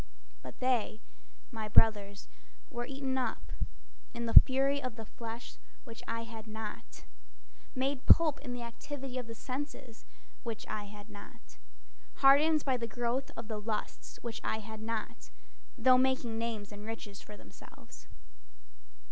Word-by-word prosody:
But -, -, -10 dB
they, 245 Hz, -4 st, +1 dB, 0.5 s
my 220 Hz, -3 st, -4 dB
brothers, 205 Hz, -2 st, +4 dB, 0.4 s
were 240 Hz, -2 st, -4 dB
eaten 270 Hz, -1 st, -2 dB
up 220 Hz, -, -3 dB, 0.6 s
In 235 Hz, -, -2 dB
the 230 Hz, -, -2 dB
fury 275 Hz, +2 st, +7 dB
of 255 Hz, -4 st, -4 dB
the 225 Hz, -2 st, -7 dB
flesh, 230 Hz, +2 st, -8 dB, 0.3 s
which 230 Hz, -4 st, -10 dB
I 230 Hz, 0 st, -2 dB
had 225 Hz, -1 st, -9 dB
not, 215 Hz, -, -7 dB, 0.7 s
Made 265 Hz, +1 st, -1 dB
pulp 315 Hz, -3 st, +7 dB
in 255 Hz, -, -6 dB
the 245 Hz, -1 st, -4 dB
activity 260 Hz, +2 st, -6 dB
of 245 Hz, -, -6 dB
the 230 Hz, -, -7 dB
senses, 260 Hz, -1 st, -6 dB, 0.4 s
which 230 Hz, -2 st, -5 dB
I 215 Hz, -1 st, -4 dB
had 205 Hz, +1 st, -11 dB
not, -, -, -13 dB, 0.6 s
Hardened 295 Hz, +3 st, +6 dB
by 260 Hz, -2 st, +2 dB
the 235 Hz, -1 st, -3 dB
growth 240 Hz, +3 st, -1 dB
of 225 Hz, -1 st, -6 dB
the 215 Hz, -2 st, -4 dB
lusts, 215 Hz, 0 st, -4 dB
which 235 Hz, -1 st, -5 dB
I -, -, 0 dB
had 220 Hz, 0 st, -8 dB
not, 220 Hz, -, -4 dB, 0.5 s
Though 255 Hz, +1 st, +6 dB
making 255 Hz, -3 st, +1 dB
names 220 Hz, -3 st, -3 dB
and 205 Hz, 0 st, -9 dB
riches 215 Hz, -2 st, -7 dB
for 210 Hz, -, -11 dB
themselves. -, -, -14 dB
230 Hz, 145 wpm, -32 LUFS, 215-260 Hz, 0.7 s, fury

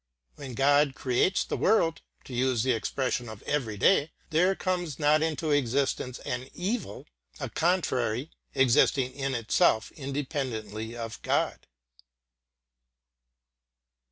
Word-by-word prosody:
When 130 Hz, -4 st, -8 dB
God 145 Hz, +1 st, +3 dB
creates 130 Hz, +9 st, +1 dB
the -, -, -3 dB
world 165 Hz, -6 st, +2 dB, 0.2 s
to 130 Hz, -, -10 dB
use 125 Hz, -2 st, +1 dB
the 130 Hz, -, +2 dB
expression 125 Hz, +1 st, -1 dB
of 110 Hz, -1 st, -10 dB
every 115 Hz, -8 st, -2 dB
day 155 Hz, -, +4 dB, 0.2 s
there 180 Hz, +5 st, +3 dB
comes 175 Hz, -7 st, -2 dB
not 150 Hz, +1 st, +3 dB
into 160 Hz, -1 st, -1 dB
existence 135 Hz, -2 st, 0 dB
an 125 Hz, +1 st, -4 dB
evil, 205 Hz, +4 st, -3 dB, 0.3 s
a -, -, -4 dB
contrary, 135 Hz, -7 st, 0 dB, 0.2 s
existing 130 Hz, 0 st, +3 dB
in 135 Hz, -1 st, -2 dB
itself 110 Hz, -1 st, +2 dB
independently 130 Hz, -6 st, -4 dB
of 115 Hz, -1 st, -6 dB
God. -, -, -1 dB
135 Hz, 115 wpm, -28 LUFS, 120-155 Hz, 0.3 s, day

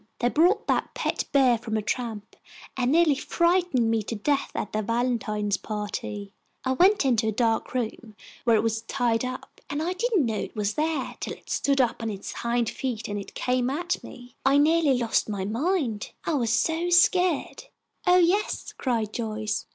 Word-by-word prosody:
They 245 Hz, -, +1 dB
bought 360 Hz, -, +3 dB
that -, -, 0 dB
pet -, -, -1 dB
beah 260 Hz, -4 st, +4 dB
from 220 Hz, -2 st, -3 dB
a 215 Hz, -, -2 dB
tramp 220 Hz, -2 st, -4 dB, 0.4 s
and 255 Hz, -1 st, +1 dB
neahly 320 Hz, -2 st, +4 dB
frightened 340 Hz, -9 st, +2 dB
me 225 Hz, -1 st, +1 dB
to 220 Hz, +2 st, -5 dB
death 280 Hz, +6 st, 0 dB
at 210 Hz, -, -3 dB
their 215 Hz, -, 0 dB
valentine 220 Hz, -2 st, -1 dB
pahty. 205 Hz, 0 st, -4 dB, 0.3 s
I 260 Hz, -, +1 dB
went 370 Hz, +5 st, +4 dB
into 235 Hz, -4 st, +2 dB
a -, -, +2 dB
dahk 225 Hz, +2 st, 0 dB
room, 225 Hz, -2 st, -4 dB, 0.3 s
where 235 Hz, -2 st, +4 dB
it 215 Hz, -, +2 dB
was 225 Hz, -1 st, 0 dB
tied 230 Hz, -1 st, 0 dB
up, 255 Hz, +1 st, -7 dB
and 290 Hz, -, -2 dB, 0.2 s
didn't 410 Hz, -, +1 dB
know 220 Hz, -2 st, -1 dB
it -, -, -6 dB
was 210 Hz, -1 st, -1 dB
theah 305 Hz, -1 st, -2 dB
till -, -, -4 dB
it -, -, -12 dB
stood 275 Hz, -1 st, +1 dB
up 245 Hz, -2 st, +1 dB
on 225 Hz, -, -2 dB
its 200 Hz, -2 st, -6 dB
hind 235 Hz, 0 st, -1 dB
feet 240 Hz, -2 st, -3 dB
and 205 Hz, -1 st, -5 dB
came 250 Hz, 0 st, 0 dB
at 345 Hz, +6 st, -2 dB
me. 245 Hz, -1 st, -12 dB
I 275 Hz, +1 st, +4 dB
neahly 300 Hz, -3 st, +4 dB
lost 230 Hz, -2 st, +1 dB
my 200 Hz, -2 st, -2 dB
mind, 240 Hz, -, -1 dB, 0.2 s
I 330 Hz, -, 0 dB
was 240 Hz, -6 st, +1 dB
so 325 Hz, +8 st, +1 dB
sca'd." 355 Hz, -, +3 dB, 0.4 s
"Oh, 360 Hz, 0 st, +6 dB
yes," 365 Hz, +4 st, +1 dB
cried 225 Hz, -5 st, -1 dB
Joyce. 215 Hz, -2 st, -3 dB
245 Hz, 180 wpm, -26 LUFS, 220-300 Hz, 0.4 s, Oh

